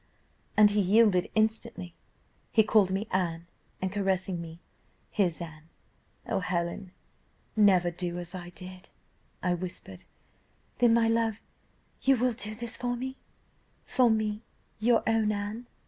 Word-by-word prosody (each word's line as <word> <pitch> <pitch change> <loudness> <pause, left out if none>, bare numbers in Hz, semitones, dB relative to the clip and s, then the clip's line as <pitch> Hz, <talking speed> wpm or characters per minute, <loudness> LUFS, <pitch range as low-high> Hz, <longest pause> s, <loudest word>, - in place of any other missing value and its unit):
"And 210 -1 +7
he 205 0 +2
yielded 195 -1 +4
instantly, 220 -4 0 0.6
he 220 - +5
called 210 -2 +4
me 195 +3 -2
Anne, 170 -3 -1 0.4
and 190 - 0
caressing 190 -3 -1
me, 165 0 -9 0.5
'his 180 -6 +1
Anne.' 160 -2 -9 0.6
'O - - 0
Helen! 180 +1 -2 0.6
never 190 -5 +5
do 175 0 -4
as 175 +1 -6
I 175 -1 -7
did.' 185 +1 -10 0.5
I 180 - +2
whispered, 170 - -7 0.7
'Then, 240 -2 +5
my 230 -1 +4
love, 225 -1 +1 0.6
you 270 -1 +4
will 250 +1 +2
do 215 0 -5
this 235 +1 -5
for 245 0 -1
me 260 +2 -5 0.7
for 250 -3 +3
me, 215 -1 0 0.4
your 230 +1 +3
own 225 -1 +2
Anne? 210 +3 -4
205 Hz, 135 wpm, -29 LUFS, 180-225 Hz, 0.7 s, And